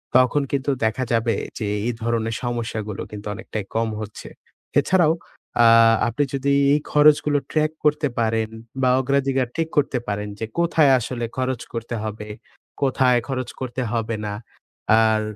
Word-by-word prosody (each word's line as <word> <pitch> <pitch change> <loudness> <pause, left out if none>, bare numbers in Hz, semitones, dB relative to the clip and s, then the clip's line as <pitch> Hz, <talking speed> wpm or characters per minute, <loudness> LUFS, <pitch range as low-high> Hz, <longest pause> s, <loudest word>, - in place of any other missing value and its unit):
তখন 130 +3 +4
কিন্তু 140 0 0
দেখা 115 +4 0
যাবে 115 0 +2 0.3
যে, 105 - -2 0.2
এই 120 - 0
ধরনের 115 -1 -1
সমস্যাগুলো 115 -4 -3
কিন্তু 105 0 -8
অনেকটাই 105 0 -6
কম 115 0 +1
হচ্ছে। 105 -1 -8 0.5
এছাড়াও, 175 -4 +3 0.4
অ্যাঁ 115 -1 +7
আপনি 120 +5 0
যদি 140 +1 +1 0.2
এই 150 - +3
খরচগুলো 150 0 +5
track 155 0 +1
করতে 150 0 +3
পারেন 110 -1 0 0.3
বা, 130 - +3
অগ্রাধিকার 135 -1 +1
ঠিক 165 -1 0
করতে 140 -3 +2
পারেন 105 0 -2
যে, 110 - -2
কোথায় 160 -4 +4
আসলে 120 0 -4
খরচ 130 -2 -1
করতে 115 0 -4
হবে? 105 -1 -5 0.5
কোথায় 130 -2 +3
খরচ 130 -3 -3
করতে 130 -1 -4
হবে 115 -1 -1
না। 100 - -3 0.7
আর 110 -1 +3
120 Hz, 150 wpm, -22 LUFS, 115-140 Hz, 0.7 s, অ্যাঁ